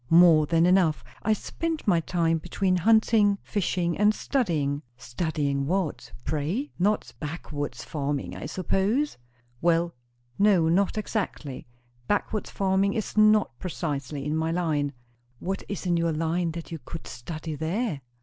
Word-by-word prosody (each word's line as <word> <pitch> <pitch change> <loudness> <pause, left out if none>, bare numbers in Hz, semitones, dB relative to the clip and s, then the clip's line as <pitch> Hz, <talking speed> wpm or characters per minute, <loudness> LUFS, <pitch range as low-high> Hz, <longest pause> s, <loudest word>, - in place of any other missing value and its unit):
"More 165 -3 +7
than 165 +2 +3
enough. 180 -4 +3 0.2
I 220 - +2
spent 320 +8 -3
my 175 -4 +5
time 165 -1 +1
between 185 +2 0
hunting 215 +1 +4
fishing 180 -4 0
and 210 +1 +4
studying." 155 - 0 0.2
"Studying 140 0 -1
what, 180 -2 -1
pray? 165 - -2
Not 205 +3 +1
backwoods 145 -5 -5
farming, 145 -2 -3
I - - -5
suppose?" 200 - 0 0.4
"Well, 170 0 +2 0.5
no, 195 -5 +5
not 195 +5 +2
exactly. 190 - -3 0.4
Backwoods 205 +1 -1
farming 195 0 +1
is 215 - -3
not 215 - +4
precisely 145 -5 -3
in 150 +1 -1
my 160 +1 0
line." 155 -5 0 0.4
"What 190 +8 -3
is 200 -1 -4
in 175 -1 +2
your 165 -1 +1
line 165 +2 0
that 170 +1 -7
you 165 - -5
could 165 - -8
study 155 +5 -6
there?" 160 - -2
170 Hz, 140 wpm, -26 LUFS, 155-200 Hz, 0.5 s, More